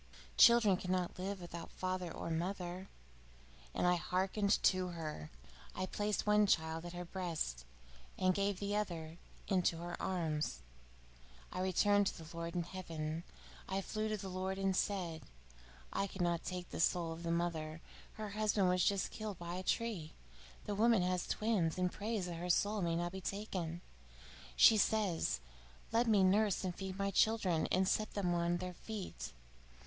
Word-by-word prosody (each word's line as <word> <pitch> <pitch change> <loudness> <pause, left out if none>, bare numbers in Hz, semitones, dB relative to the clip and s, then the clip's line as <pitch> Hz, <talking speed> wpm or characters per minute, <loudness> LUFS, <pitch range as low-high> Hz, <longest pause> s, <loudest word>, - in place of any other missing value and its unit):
Children 235 -5 +7
cannot 180 -1 -2
live 195 +1 -3
without 170 -1 -7
father 185 -2 -3
or 165 - -5
mother.' 180 +2 -3 0.9
And - - +1
I 180 0 +4
hearkened 190 +4 +1
to 185 -1 +3
her. 155 - -5 0.5
I 185 - -1
placed 205 +2 -1
one 210 0 +5
child 160 -2 +1
at 175 - -6
her 175 0 -5
breast 165 - -3 0.5
and 185 0 +3
gave 200 0 0
the 205 0 -1
other 170 -5 -3 0.3
into 180 -4 +2
her 175 +1 -5
arms, 155 - -1 0.9
and 180 - -3
returned 205 +2 +3
to - - -2
the 165 0 -10
Lord 170 0 -4
in 175 - +1
heaven. 165 -3 -4 0.5
I 190 +1 0
flew 215 +2 -2
to 215 - -1
the 195 -1 -6
Lord, 190 +1 -2
and 195 -1 +1
said: 180 -5 -1 0.7
'I 195 - 0
could 190 -1 -6
not 170 -1 +1
take 180 -1 -5
the - - -5
soul 170 0 +2
of 165 +1 -6
the 170 - -3
mother. 165 -2 -1 0.3
Her 215 -1 -5
husband 210 -2 +2
was 185 +2 +2
killed 215 -4 -5
by 170 0 -5
a 185 - -3
tree; 190 -5 -1 0.5
the 205 - -2
woman 220 -1 +4
has 180 0 0
twins, 205 -8 +1
and 180 -1 +1
prays 210 -2 -2
that 175 -2 -5
her 175 +2 -4
soul 205 +4 +2
may 170 -2 +1
not 175 +1 -1
be 190 +1 -6
taken. 180 -4 -3 0.7
She 220 - +8
says: 205 - +1 0.5
"Let 230 +2 +3
me 210 -4 +5
nurse 200 +1 +3
and 185 -2 -1
feed 190 0 -5
my 200 0 0
children, 195 -7 +3
and 185 +1 +3
set 215 +2 0
them 185 -4 +1
on 170 0 +1
their 180 0 -5
feet. 195 - -6
185 Hz, 170 wpm, -36 LUFS, 170-200 Hz, 0.9 s, She